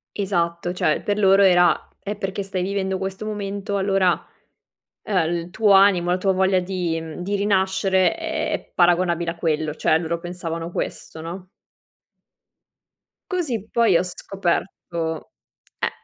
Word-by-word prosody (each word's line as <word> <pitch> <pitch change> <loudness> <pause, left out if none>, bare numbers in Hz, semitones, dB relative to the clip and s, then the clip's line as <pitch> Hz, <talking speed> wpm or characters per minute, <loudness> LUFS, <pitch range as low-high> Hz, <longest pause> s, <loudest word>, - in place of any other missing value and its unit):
Esatto. 175 -3 -1
Cioè, 155 -4 +1
per 205 0 -1
loro 195 -1 +5
era: 180 -2 +4 0.2
"Eh, 205 +1 -3
perché 195 0 -3
stai 190 -2 -3
vivendo 190 0 -1
questo 190 +2 -5
momento 200 -1 -3
allora, 195 -2 +3 0.9
uhm, 175 -5 0
il 170 +1 -4
tuo 210 +2 +3
animo, 195 -3 +5
la 180 - +3
tua 195 +1 +2
voglia 190 0 +2
di 180 -3 -2
mhmm, 160 +1 -8
di 200 +3 -1
rinascere 190 -2 +2
è - - -3
paragonabile 175 -1 +2
a 170 - -16
quello", 155 -2 -1
cioè 160 - +2
loro 170 0 -2
pensavano 170 -1 -5
questo, 160 - -5
no? 175 +3 -7 1.8
Così 270 - -2
poi 230 -6 +3
ho 170 - +4
scoperto, 175 -3 -3 0.5
eh - - +1
185 Hz, 140 wpm, -22 LUFS, 170-195 Hz, 1.8 s, loro